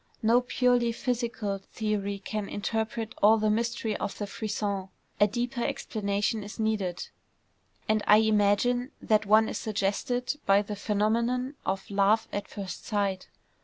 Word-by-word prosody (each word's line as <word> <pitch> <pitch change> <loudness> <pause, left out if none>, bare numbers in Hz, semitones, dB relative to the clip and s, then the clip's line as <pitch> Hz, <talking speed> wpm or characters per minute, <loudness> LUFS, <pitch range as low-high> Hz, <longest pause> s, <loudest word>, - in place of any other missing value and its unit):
No 235 +3 +5
purely 245 -1 +2
physical 230 -4 -2
theory 205 0 -3
can 205 +1 -4
interpret 220 +2 -2
all 215 +2 +7
the 215 -1 +2
mystery 230 -1 -1
of - - -4
the 205 - -3
frisson. 200 -2 -3 0.3
A 205 - +6
deeper 240 +3 -2
explanation 210 0 -1
is 205 +3 -9
needed; 210 -5 -1 0.8
and 215 0 +2
I 210 - +8
imagine 220 +4 +2
that 215 -2 +1
one 220 +2 +5
is - - -3
suggested 225 +6 -1
by 200 +1 +5
the 210 0 -5
phenomenon 230 +6 0
of 195 0 -2
"love 200 +2 +3
at 205 - -3
first 195 -3 -7
sight." 200 -3 -1
215 Hz, 140 wpm, -28 LUFS, 200-230 Hz, 0.8 s, I